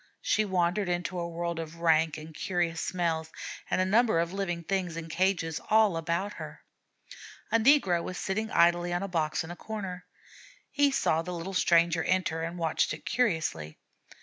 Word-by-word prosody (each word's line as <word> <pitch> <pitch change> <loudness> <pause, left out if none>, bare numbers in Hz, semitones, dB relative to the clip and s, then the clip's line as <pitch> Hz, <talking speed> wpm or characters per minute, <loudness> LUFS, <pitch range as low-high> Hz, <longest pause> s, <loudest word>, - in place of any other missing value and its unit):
She 215 - +2
wandered 185 0 0
into 175 +1 -2
a 170 0 -3
world 170 0 -3
of 165 0 -6
rank 160 -2 +2
and 155 +1 -10
curious 170 -1 -1
smells 165 -3 -1 0.4
and - - +1
a 185 - +3
number 220 0 +3
of 170 +2 -1
living 175 -4 -2
things 180 -2 -2
in 165 0 -6
cages 165 -2 0
all 215 -4 +4
about 170 +5 -2
her. - - -9 0.9
A 230 - +4
negro 220 - +4
was 180 +1 -5
sitting 220 +3 -2
idly 175 +1 +3
on 175 +2 -1
a - - -2
box 160 -3 -1
in 160 - -8
a - - -6
corner. 190 -3 -6 0.6
He 285 -1 +3
saw 165 - +1
the 180 +2 -6
little 170 +3 -5
stranger 170 -2 +3
enter 180 -3 0
and 165 +2 -4
watched 165 -2 0
it - - -16
curiously. 160 - -1
175 Hz, 175 wpm, -29 LUFS, 165-190 Hz, 0.9 s, all